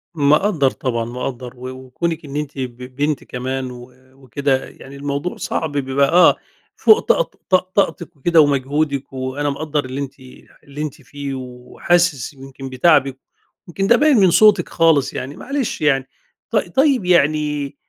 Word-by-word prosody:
مقدر 150 +1 +3
طبعًا 115 -3 -2
مقدر، 125 +1 -6
و 125 +1 -7
وكونك 130 +6 -4
إن 140 -1 -9
أنتِ 150 -1 -4
ب 125 -2 -5 0.2
بنت 145 0 -1
كمان 130 +1 -4
و 125 0 -11 0.3
وكده، 130 +2 -1
يعني 135 +1 -13
الموضوع 140 +4 -4
صعب 160 - -3
بيبقى 140 0 +1
آه، 180 +1 +6 0.4
فوق 435 +1 +5
طاق - - 0
طاق 185 0 +2
طاقتك 180 -5 0
وكده 165 +4 +4
ومجهودك، 140 0 0
وأنا 130 +2 -2
مقدر 150 0 -2
اللي 130 +2 -5
أنتِ 140 0 -7 0.4
اللي 140 +1 -8
أنتِ 150 -3 -5
فيه 140 -1 -7
وحاسس 130 +4 -1
يمكن 135 0 -10
بتعبِك، 130 0 +3 0.5
يمكن 195 +3 -2
ده 235 - +6
باين 295 0 +4
من 190 -4 +5
صوتك 205 -2 +5
خالص 165 -5 +2
يعني، 135 +3 -5
معلش 275 -2 -3
يعني. 135 -3 +2 0.4
ط - - +2 0.2
طيب 270 -6 +3
يعني، 150 -4 +1
140 Hz, 150 wpm, -19 LUFS, 130-170 Hz, 0.5 s, آه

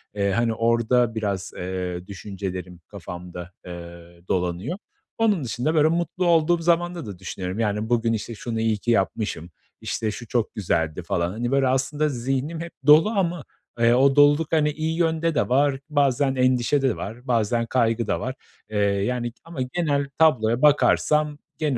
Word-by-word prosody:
Eee, 100 -1 +1
hani, 115 +3 +1
orada 115 +1 +2
biraz, 100 -4 -2
eee, 90 0 -4
düşüncelerim 95 -2 -6
kafamda, 90 -2 -8
eee, 85 -1 -10
dolanıyor. 90 - -1 0.4
Onun 210 -9 +2
dışında, 125 +6 -1
böyle, 155 0 +5
mutlu 170 +2 -1
olduğum 170 0 +3
zamanda 175 0 +1
da 100 -4 -8
düşünüyorum, 95 +2 -5
yani, 105 0 -1
bugün, 115 -1 +2
işte, 110 +1 -4
şunu 115 0 -4
iyi 110 -1 +1
ki 120 +3 -1
yapmışım, 95 -5 -1 0.3
işte, 110 -1 -2
şu 120 +1 -8
çok 120 -3 -1
güzeldi 85 -4 -1
falan. 85 -1 -1
Hani, 120 +4 -3
böyle, 135 -1 +3
aslında 135 +4 0
zihnim 135 +5 -2
hep 170 - -6 0.2
dolu 155 +7 +7
ama, 175 -7 -1 0.4
eee, 115 0 +5
o 135 +2 +4
doluluk, 145 +2 +4
hani, 150 -2 +3
iyi 160 +2 -2
yönde 165 -1 +1
de - - +1
var, 135 +1 +2
bazen 140 -2 +2
endişe 130 +2 +2
de 130 -4 +1
var, 120 +5 -8
bazen 115 0 +1
kaygı 115 -2 +1
da - - 0
var. 130 +1 -4 0.3
Eee, 105 - -3
yani, 105 +5 0
ama 165 -4 -9
genel 140 0 -1
tabloya 125 -7 +3
bakarsam 150 0 +3 0.2
genel 145 -5 0
120 Hz, 165 wpm, -24 LUFS, 100-150 Hz, 0.4 s, dolu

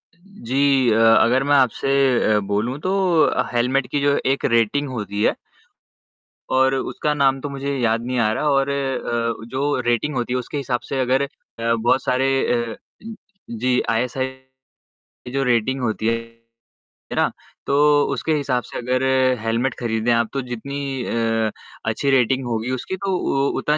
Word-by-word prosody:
जी, 140 - 0
अ, 110 - +2 0.2
अगर 125 +3 +3
मैं 145 +1 +3
आपसे 130 0 +2 0.5
अ, - - +3
बोलूं 115 +6 -1
तो 185 +5 -2 0.6
हेलमेट 125 +2 +1
की 145 - -2
जो 140 0 +2 0.2
एक - - -6
रेटिंग 130 +6 +1
होती 105 -4 -3
है - - +2 1.2
और 130 0 +4
उसका 150 +3 -2
नाम 135 -2 +2
तो 145 - -4
मुझे 140 0 -3
याद 115 -2 +1
नहीं 125 0 -2
आ 110 -2 +2
रहा 150 +6 0
और 135 -1 +2
अ, 120 -5 -2
जो 140 +2 -1
रेटिंग 120 +5 0
होती 125 0 -2
है 125 - +1
उसके 125 +4 -6
हिसाब 130 -3 -1
से 135 - -2
अगर 130 +1 +2
अ, - - -2 0.5
बहुत 120 +3 +1
सारे 130 +1 +1 0.5
अ, - - -10 0.7
जी, 125 +2 0
आईएसआई 125 +3 0
की 130 0 -22 0.6
जो 135 +1 0
रेटिंग 125 +2 +1
होती 110 -2 -1
है 115 0 0 0.9
ना, - - +2 0.4
तो 145 +1 +4
उसके 155 +5 -1
हिसाब 135 -5 -1
से - - -8
अगर 125 +1 -1 0.4
हेलमेट 115 +3 0
खरीदें 115 0 0
आप 115 -1 +2
तो 135 - -1
जितनी 135 +2 -4
अ, 115 -1 0 0.3
अच्छी 110 +6 -1
रेटिंग 130 0 +2
होगी 115 +1 -2
उसकी 130 +9 -4
तो 190 -1 +1 0.4
उतना 150 +1 +1
130 Hz, 160 wpm, -21 LUFS, 115-140 Hz, 1.2 s, और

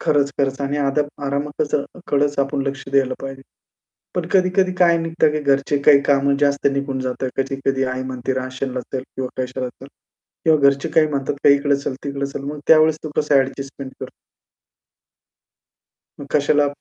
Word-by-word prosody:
खरंच, 140 -1 +2
खरंच 135 0 0
आणि 140 +1 -1
आरामातच 145 +1 -2 0.4
कडचं 145 0 +2
आपण 140 0 -2
लक्ष 135 -1 -4
द्यायला 135 -2 +2
पाहिजे. 135 0 -7 0.7
पण 180 -2 -1
कधी-कधी 185 0 +3
काय 170 -2 +5
निघतं 165 -2 +1
की 155 - -1
घरचे 140 0 +1
काही 140 -1 +6
कामं 140 0 +2
जास्त 140 -1 +2
निघून 140 -1 -2
जातात. 130 0 -3
कधी-कधी 135 0 -1
आई 130 0 -4
म्हणते, 130 0 -3
"राशनला 130 0 -3
चल," 130 - -1
किंवा 130 -1 -6
कशाला 130 0 -3
चल 135 +2 -14 0.6
किंवा 160 -2 +5
घरचे 140 0 -3
काही 155 -1 +3
म्हणतात, 140 -1 -3
"इकडे 140 0 +4
चल, 140 -1 -4
तिकडे 140 -1 -3
चल." 140 0 -6
मग 145 +1 -5
त्यावेळेस 155 -1 +6
तू 155 - -4
कसं 150 -1 +2
ॲडजस्टमेंट 135 0 -1
कर - - -4 2.1
मग 140 - -7
कशाला 145 0 +3
140 Hz, 155 wpm, -20 LUFS, 135-145 Hz, 2.1 s, काही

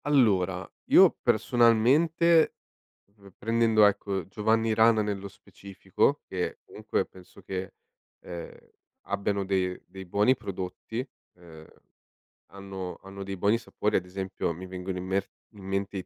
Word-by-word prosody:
Allora, 95 - +2 0.2
io - - +7
personalmente, 150 +9 +3 0.6
uhm, 100 -3 -17
prendendo, 115 -1 +3
ecco, 100 -3 -2
Giovanni 110 +2 +1
Rana 110 0 +5
nello 100 -1 -3
specifico, 100 +6 -2
che 90 -2 -3
comunque - - -3
penso 95 +1 -16
che, 95 0 -5 0.5
ehm, 85 -1 -8 0.5
abbiano 100 0 -1
de 95 -1 -1
dei 95 0 -10
buoni 105 +8 +3
prodotti, 100 +1 -6 0.4
ehm, 80 -3 -14 0.8
hanno 95 -2 -7
hanno 100 0 -8
dei 95 0 -5
buoni 100 +5 +2
sapori, 115 - -2
ad - - +2
esempio 95 -2 -3
mi 90 +3 -9
vengono 90 0 -5
in 90 - -5
mer 95 +1 0 0.3
in 100 - -12
mente 100 +1 -3
i 95 -2 -4
100 Hz, 130 wpm, -27 LUFS, 95-110 Hz, 0.8 s, io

